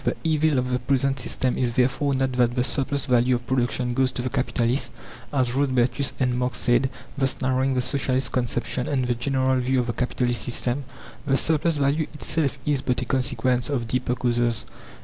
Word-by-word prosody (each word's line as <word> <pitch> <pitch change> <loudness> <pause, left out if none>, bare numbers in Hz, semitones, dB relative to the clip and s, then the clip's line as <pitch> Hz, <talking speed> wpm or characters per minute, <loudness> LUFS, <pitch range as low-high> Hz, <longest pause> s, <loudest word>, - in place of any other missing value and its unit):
The - - -1
evil 155 -2 +2
of 125 0 0
the 125 - +1
present 135 0 +1
system 130 -1 -1
is 120 -2 +1
therefore 135 +3 +1
not 130 0 0
that 125 -1 +1
the 125 - +2
"surplus 140 +1 0
value" 125 -1 +3
of 120 0 -5
production 125 -1 0
goes 130 +1 +2
to 125 - -3
the 130 - -2
capitalist, 125 -1 0 0.4
as 130 -4 +1
Rodbertus 130 0 +1
and 125 -2 +1
Marx 125 0 -1
said, 125 +2 +2 0.3
thus 135 -1 +1
narrowing 130 0 +1
the 125 - +2
Socialist 130 0 0
conception 125 0 -1
and 130 -3 0
the 125 - +1
general 130 +1 +1
view 130 +1 +1
of 125 - 0
the 120 - -2
capitalist 125 -1 -1
system; 125 +2 -1 0.4
the 135 -1 +3
surplus 160 +1 +1
value 145 +2 +1
itself 150 -2 -1
is 145 -3 +1
but 125 -2 -1
a - - -5
consequence 130 -1 0
of 125 -5 -1
deeper 125 +1 -1
causes. 120 -2 0
130 Hz, 190 wpm, -24 LUFS, 125-135 Hz, 0.4 s, value